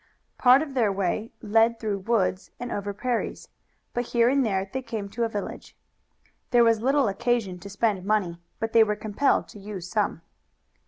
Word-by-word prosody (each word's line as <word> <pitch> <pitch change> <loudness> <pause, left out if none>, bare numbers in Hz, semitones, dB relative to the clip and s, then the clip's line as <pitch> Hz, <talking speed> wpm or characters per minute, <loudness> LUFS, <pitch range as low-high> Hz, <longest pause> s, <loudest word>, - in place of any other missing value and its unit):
Part 255 +3 +6
of 290 -3 -8
their 230 -6 +2
way 195 +3 -2
led 225 +2 +3
through 210 -3 -2
woods 195 -2 0
and 245 0 -5
over 205 0 -3
prairies, 240 +3 -3 0.4
but 240 - 0
here 235 0 +2
and 275 +1 +3
there 195 -4 0
they 265 - -2
came 225 -5 -5
to 235 +3 -1
a - - -2
village. 205 -2 -6 0.7
There 240 -2 +5
was 230 -2 +3
little 270 +1 +3
occasion 205 -3 -1
to 200 - -10
spend 200 -2 0
money, 190 -5 0 0.2
but 225 0 -3
they 230 - +7
were 210 -1 0
compelled 215 +6 +1
to 210 - -12
use 195 -3 -7
some. 200 -5 -1
220 Hz, 180 wpm, -26 LUFS, 200-240 Hz, 0.7 s, they